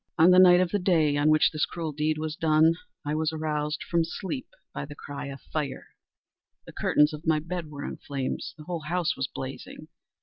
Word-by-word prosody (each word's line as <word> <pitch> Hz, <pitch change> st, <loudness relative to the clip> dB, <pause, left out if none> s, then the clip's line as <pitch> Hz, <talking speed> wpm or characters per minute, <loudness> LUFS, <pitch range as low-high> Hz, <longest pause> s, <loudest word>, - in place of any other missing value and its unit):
On 170 Hz, +3 st, +7 dB
the 180 Hz, -, +7 dB
night 180 Hz, -1 st, +8 dB
of 180 Hz, -1 st, +1 dB
the 205 Hz, -, +1 dB
day 165 Hz, -6 st, +3 dB
on 145 Hz, +1 st, +3 dB
which 155 Hz, 0 st, +4 dB
this 155 Hz, -1 st, 0 dB
cruel 165 Hz, -3 st, -4 dB
deed 155 Hz, +1 st, 0 dB
was 155 Hz, 0 st, -3 dB
done, 160 Hz, 0 st, +4 dB, 0.3 s
I 145 Hz, -, -1 dB
was 155 Hz, 0 st, 0 dB
aroused 150 Hz, -1 st, -2 dB
from 170 Hz, -1 st, +1 dB
sleep 190 Hz, -, -5 dB, 0.3 s
by -, -, -4 dB
the 145 Hz, +1 st, -9 dB
cry 145 Hz, 0 st, -7 dB
of 140 Hz, 0 st, -8 dB
fire. 145 Hz, -4 st, -3 dB, 0.8 s
The -, -, -12 dB
curtains 150 Hz, +1 st, +3 dB
of 150 Hz, +2 st, -8 dB
my 160 Hz, -1 st, +4 dB
bed 165 Hz, +1 st, -4 dB
were 145 Hz, -1 st, -7 dB
in -, -, -5 dB
flames. 135 Hz, -2 st, -4 dB
The 155 Hz, -, -10 dB
whole 165 Hz, -1 st, -5 dB
house 175 Hz, 0 st, 0 dB
was 135 Hz, -, -2 dB
blazing. 130 Hz, 0 st, -8 dB
155 Hz, 210 wpm, -27 LUFS, 150-170 Hz, 0.8 s, night